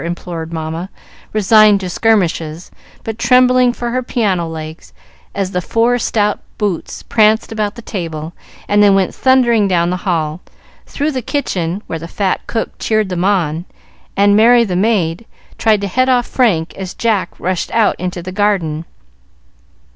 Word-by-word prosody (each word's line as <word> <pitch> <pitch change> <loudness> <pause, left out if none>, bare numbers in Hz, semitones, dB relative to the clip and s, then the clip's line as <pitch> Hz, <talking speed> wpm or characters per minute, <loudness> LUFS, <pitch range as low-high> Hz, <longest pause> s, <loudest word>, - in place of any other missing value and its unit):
implored 170 -1 -5
Mamma, 160 +2 -4 0.4
resigned 215 0 +5
to 185 - -4
skirmishes, 175 -5 0 0.3
but 225 0 -5
trembling 250 -1 +4
for 240 0 -4
her 255 +1 0
piano 200 -9 -1
legs 160 - -8 0.4
as 195 -1 -2
the 180 - -1
four 235 +6 +1
stout 210 -2 0 0.2
boots 205 -6 -3
pranced 220 0 +2
about 215 -2 -2
the 235 - -10
table 165 -5 -5 0.3
and 205 0 +3
then 200 -1 +5
went 190 -2 +1
thundering 240 -5 +3
down 175 -2 +1
the 180 - -1
hall, 165 -3 -2 0.5
through 290 +2 -2
the 260 -3 -3
kitchen 195 - -2
where 165 - -5
the 165 - -7
fat 190 +2 -1
cook 225 - -2
cheered 215 -3 0
them 180 -1 -2
on, 175 -5 0 0.5
and 200 0 +4
Mary, 235 +3 +6
the 190 -5 -2
maid, 185 -3 +1 0.4
tried 215 -2 +3
to 200 - -2
head 255 +7 +1
off 245 -2 +3
Frank 185 -11 +1
as 190 -1 -7
Jack 215 -6 -1
rushed 185 -1 -2
out 225 -2 +2
into 180 -1 -4
the 185 - -6
garden. 185 -6 0
200 Hz, 160 wpm, -16 LUFS, 170-225 Hz, 0.5 s, Mary